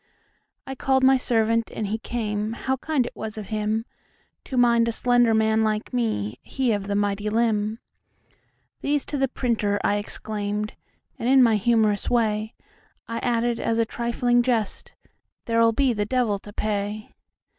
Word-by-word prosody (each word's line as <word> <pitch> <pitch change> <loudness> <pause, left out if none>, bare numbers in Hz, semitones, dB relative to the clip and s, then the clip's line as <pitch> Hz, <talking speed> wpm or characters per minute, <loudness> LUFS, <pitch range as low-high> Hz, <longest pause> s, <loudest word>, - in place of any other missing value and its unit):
I 265 - -5
called 265 0 +1
my 265 +1 +6
servant, 230 -2 +1
and 215 - -3
he 215 +3 -2
came; 215 -2 -3
How 265 +3 -2
kind 285 -2 0
it - - -8
was 220 0 -6
of 210 -3 -7
himTo 215 0 -1 0.7
mind 235 -1 +4
a - - +1
slender 245 -1 +3
man 220 0 +3
like 215 +3 -1
me, 125 - -1
He 260 -3 -1
of 205 -2 -2
the 200 - -1
mighty 205 +1 0
limb."These 225 +5 -4
to 290 - -3
the 270 - +2
printer," 220 -5 -1
I 205 - +2
exclaimed, 210 0 -4 0.5
And, 235 - -1
in 265 -1 +7
my 230 -2 +4
humorous 215 -1 +2
way,I 225 0 -3
added 240 -1 0
(as 230 - 0
a 230 - +3
trifling 240 +1 +1
jest,)"There 230 0 -3
'll 230 - +6
be 260 +2 +2
the 205 -2 -2
devil 230 -5 +1
to 205 - -12
pay." 210 0 -3
225 Hz, 155 wpm, -24 LUFS, 210-240 Hz, 0.7 s, in